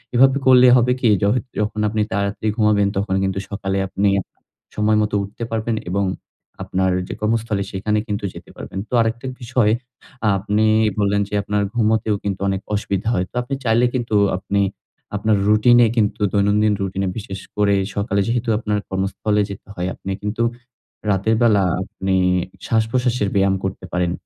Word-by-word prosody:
এভাবে 135 +2 +5
করলে 125 -1 +7
হবে 125 +1 +3
কী? 120 - +4
যহ 100 - +3 0.3
যখন 105 +1 -1
আপনি 110 0 -1
তাড়াতাড়ি 100 +2 -1
ঘুমোবেন 105 -2 +3
তখন 100 -1 0
কিন্তু 95 0 -1
সকালে 95 -1 -2
আপনি 100 +2 +1
আপনার - - -21 0.3
সময় 105 0 +2
মতো 105 0 -2
উঠতে 100 +4 -7
পারবেন 115 0 -1 0.2
এবং 100 +1 +1 0.6
আপনার 95 0 0 0.2
যে - - -5
কর্মস্থলে 110 -2 0
সেখানে 105 +2 0
কিন্তু 100 -1 -3
যেতে - - -12
পারবেন। - - -7
তো - - -10
আরেকটা 115 +2 -2 0.2
বিষয় 120 -2 +2 0.5
আ - - +4
আপনি 105 +2 +1 0.3
বললেন 100 0 +2
যে, - - -12
আপনার 105 0 0
ঘুমোতেও 110 -2 +2
কিন্তু 100 -2 -2
অনেক 95 0 -1
অসুবিধা 100 0 -2
হয়। 90 -3 0
তো - - -20
আপনি 125 +3 -6
চাইলে 115 +2 +3
কিন্তু 120 -3 -1 0.2
আপনি 100 +1 -1 0.5
আপনার 105 0 +2
রুটিনে 120 +3 +5
কিন্তু 105 -1 +1
দৈনন্দিন 105 +1 +3
রুটিনে 95 0 -2
বিশেষ 100 -3 -6 0.2
করে 100 -1 +3 0.2
সকালে 100 0 0
যেহেতু 120 0 -1
আপনার 105 -2 -1
কর্মস্থলে 95 +2 0
যেতে 100 - -9
হয়, 90 +1 -2
আপনি 95 - -6
কিন্তু 105 +3 -1 0.7
রাতের 100 +3 +2
বেলা 105 -4 +4 0.2
আপনি 95 0 -2 0.5
শ্বাসপ্রশ্বাসের 115 -1 +1
ব্যায়াম 95 0 +3
করতে 95 -1 -4
পারেন। 90 -1 +1
105 Hz, 165 wpm, -20 LUFS, 100-110 Hz, 0.7 s, করলে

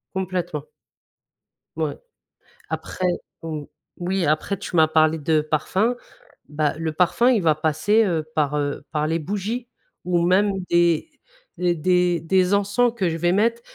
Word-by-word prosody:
Complètement. 180 -5 -3 1.1
Ouais - - -2 0.7
après 185 - -4 0.4
mmh, 155 -2 -4 0.3
oui, 180 0 -1
après 155 +6 0
tu 180 - -6
m'as 160 -2 +6
parlé 155 0 +3
de 155 +1 +2
parfum, 185 - 0 0.5
bah, 150 0 0
le 160 -1 -2
parfum 185 +9 +3
il 230 -7 +2
va 160 -2 +4
passer, 155 +9 +2
heu, 165 -5 0
par, 150 -2 +1
heu, 145 -1 -2
par 150 -1 0
les 165 +2 0
bougies 210 +8 -3 0.4
ou 175 -1 +1
même 195 +3 +3 0.2
des 170 - +2 0.5
d 175 -1 +1
des 180 +1 +2
des 185 +3 +2
encens 205 +4 +2
que 195 -6 0
je 165 - -3
vais 175 +2 +1
mettre. 230 +4 +1
175 Hz, 150 wpm, -23 LUFS, 155-195 Hz, 1.1 s, m'as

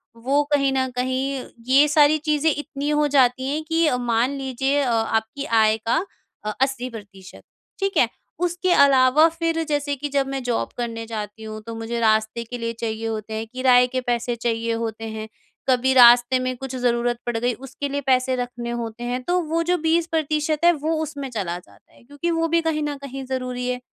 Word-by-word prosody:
वो 270 +5 +1
कहीं 275 -2 +3
न 260 -1 +1
कहीं 260 +1 -2 0.2
ये 275 +3 +6
सारी 295 +1 +5
चीजें 305 0 +2
इतनी 290 -1 -4
हो 300 0 +2
जाती 260 -2 +3
हैं 305 +2 -2
कि 325 +1 +1
अ, 250 - +1
मान 240 +1 +1
लीजिए 270 +1 -1
अ, 265 - 0
आपकी 225 +4 -1
आय 220 -2 +3
का 225 +1 0 0.5
अ, 215 - -2
80% 225 -8 -4 0.4
ठीक 390 0 -1
है? - - +4 0.3
उसके 355 +1 0
अलावा 275 +2 +6
फिर 330 0 -1
जैसे 290 -1 0
कि 290 +2 -5
जब 275 -1 0
मैं 270 0 -3
जॉब 245 -2 -1
करने 230 -2 -4
जाती 220 -1 -6
हूँ 215 0 -7
तो 230 - -5
मुझे 225 +1 -4
रास्ते 220 +1 +1
के 245 +2 -7
लिए 230 -1 -3
चाहिए 225 0 -3
होते 220 -1 -4
हैं 220 +1 -4
किराये 250 -1 +4
के 255 +1 -2
पैसे 240 -1 -1
चाहिए 230 0 -1
होते 225 -1 -4
हैं। 220 0 -6 0.4
कभी 260 +1 +3
रास्ते 245 0 +7
में 255 0 -2
कुछ 265 0 -6
ज़रूरत 240 -1 0
पड़ 240 -1 -1
गई 245 +2 0
उसके 270 +3 -6
लिए 285 +1 -2
पैसे 260 -1 +2
रखने 245 -1 -4
होते 230 +1 -6
हैं 245 +1 -2
तो 355 +6 +1
वो 330 +1 +1
जो 355 +2 +1
20% 320 -2 0
है 345 - +8
वो 315 +1 -2
उसमें 285 -3 -6
चला 195 -8 -3
जाता 100 - -23
है - - -21
क्योंकि 285 +7 -3
वो 330 0 +1
भी 335 - +4
कहीं 320 -2 -1
न 295 -1 -2
कहीं 270 -1 -7
ज़रूरी 255 -1 -3
है। 250 0 -2
255 Hz, 200 wpm, -22 LUFS, 230-290 Hz, 0.5 s, है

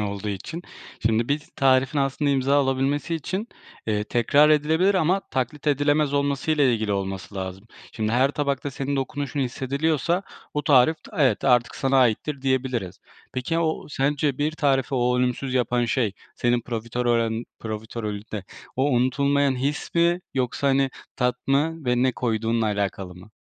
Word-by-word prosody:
olduğu 100 0 -3
için. 105 - -5 0.4
Şimdi 115 +1 +1
bir 145 +1 0
tarifin 135 +2 +3
aslında 140 +1 +1
imza 135 +1 +2
alabilmesi 140 +3 +1
için, 190 - -3 0.4
eee, 105 -1 0
tekrar 140 +7 +4
edilebilir 160 +6 +3
ama 185 +2 +2
taklit 130 +4 -3
edilemez 145 0 +2
olmasıyla 140 +1 +1
ilgili 110 -5 +1
olması 95 -1 -4
lazım. 95 +1 -5 0.3
Şimdi 110 0 -2
her 130 +3 +3
tabakta 145 -1 -2
senin 140 +1 -3
dokunuşun 140 +1 -3
hissediliyorsa 140 +7 0 0.3
o 150 - 0
tarif, 140 +2 +5
t - - -13
evet 130 -7 +3
artık 125 -2 +3
sana 135 0 +2
aittir 130 +4 +1
diyebiliriz. 130 -8 -1 0.3
Peki, 130 +6 -2
aaa, - - +1
o 160 -1 -1
sence 140 -1 0
bir 150 +2 0
tarifi 135 -4 +1
o 125 0 +2
ölümsüz 125 +1 -1
yapan 125 -1 +1
şey 115 -4 0 0.2
senin 120 0 +1
profiterorün 115 0 -1
profiterolünde 110 -2 -5 0.3
o 130 - +2
unutulmayan 140 +2 +2
his 140 +4 -3
mi 170 +1 +3
yoksa, 130 +2 0
hani, 135 0 +2 0.3
tat 125 -1 +1
mı 150 +3 +1
ve 125 0 +2
ne 130 -1 +3
koyduğunla 115 -1 0
alakalı 100 -3 -2
mı? 90 +5 -14
130 Hz, 150 wpm, -24 LUFS, 115-145 Hz, 0.4 s, tarif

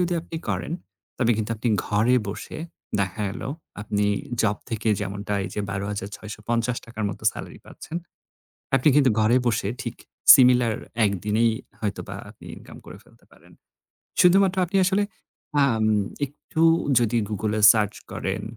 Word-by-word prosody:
যদি 180 0 +1
আপনি 165 0 -8
করেন - - -2 0.5
তবে 120 -1 +2
কিন্তু 110 0 -3
আপনি 120 +2 -2 0.2
ঘরে 115 +5 +3
বসে 100 - -6 0.4
দেখা 100 +2 -2
গেল 100 - -7 0.4
আপনি 105 -1 -1 0.4
জব 105 -1 +1
থেকে 110 0 -2
যেমনটা 100 +1 -3
এই - - -4
যে 105 - -2
৳১২,৬৫০ 105 +4 -4
র - - 0
মতো - - -10
সেলারি - - -9
পাচ্ছেন। 165 - -8 0.8
আপনি 135 +3 +4
কিন্তু 135 -3 +5
ঘরে 115 +4 +4
বসে 105 -3 0
ঠিক 120 -2 -5 0.4
সিমিলার 125 -3 +5 0.3
১ 100 - +2
দিনেই 110 +2 +3 0.3
হয়তোবা 105 -2 -4
আপনি - - -15
ইনকাম - - -13
করে - - -10
ফেলতে - - -24
পারেন। - - -20 0.7
শুধুমাত্র 190 +1 +5
আপনি 195 +3 -2
আসলে 195 +2 +2 0.6
আম 110 -4 +1 0.4
একটু 150 +3 -4 0.4
যদি 120 0 +1
Google-এ 105 +1 -1
সার্চ 105 -3 0 0.2
করেন - - -3
110 Hz, 140 wpm, -24 LUFS, 105-125 Hz, 0.8 s, কিন্তু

